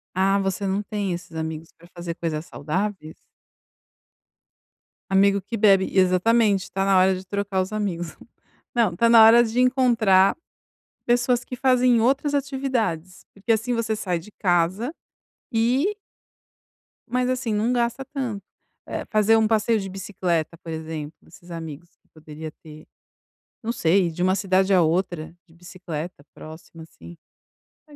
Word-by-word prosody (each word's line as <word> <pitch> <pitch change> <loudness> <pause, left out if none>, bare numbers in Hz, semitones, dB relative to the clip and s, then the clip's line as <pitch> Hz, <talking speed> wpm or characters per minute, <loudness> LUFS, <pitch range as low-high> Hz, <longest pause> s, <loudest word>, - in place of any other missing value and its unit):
Ah, 195 +1 +2
você 195 0 -2
não 195 +1 0
tem 200 -3 -3
esses 175 0 -8
amigos 160 0 -5
para 170 - -18
fazer 170 -1 -5
coisas 160 -2 -4
saudáveis? 170 +1 -4 1.9
Amigo 200 +1 +3
que 215 +5 -6
bebe, 195 -3 +4
exatamente, 195 +2 +3
tá 195 - -2
na 195 -1 +3
hora 185 +1 +4
de 185 +1 -8
trocar 200 0 -2
os 185 +2 -4
amigos. 180 -6 -3 0.6
Não 225 -7 +2
está 230 +7 +2
na 230 -1 +8
hora 225 +2 +8
de 230 +1 -2
encontrar 235 -7 +4 0.7
pessoas 245 0 +2
que - - -7
fazem 250 -2 +3
outras 275 +5 +1
atividades, 260 - -2
porque 205 +4 -1
assim 225 +3 0
você 230 -1 -1
sai 180 -4 -2
de 190 +6 -14
casa 185 - 0 0.6
e 260 - +1 1.1
mas 250 +1 0
assim 250 -3 -1
não 215 +3 +1
gasta 240 +2 -1
tanto, 250 -7 -5 0.4
né, - - -4
é - - -8
fazer 215 +1 +4
um 220 -1 +3
passeio 220 +1 +2
de 195 -1 -6
bicicleta, 180 -4 -3
por 165 - -12
exemplo, 160 -1 -6
desses 175 - -18
amigos 165 0 -8
que - - -39
poderia 155 0 -9
ter. 155 -1 -13 0.8
Não 230 - -1
sei, 180 -3 +2
de 175 +2 -3
uma 185 +1 +3
cidade 190 0 +1
a 185 - +5
outra, 170 -1 -1
de 165 - -22
bicicleta 175 -3 -8
próxima 160 +1 -12
assim. 165 +1 -14 0.7
Não 295 - -16
195 Hz, 150 wpm, -23 LUFS, 175-230 Hz, 1.9 s, na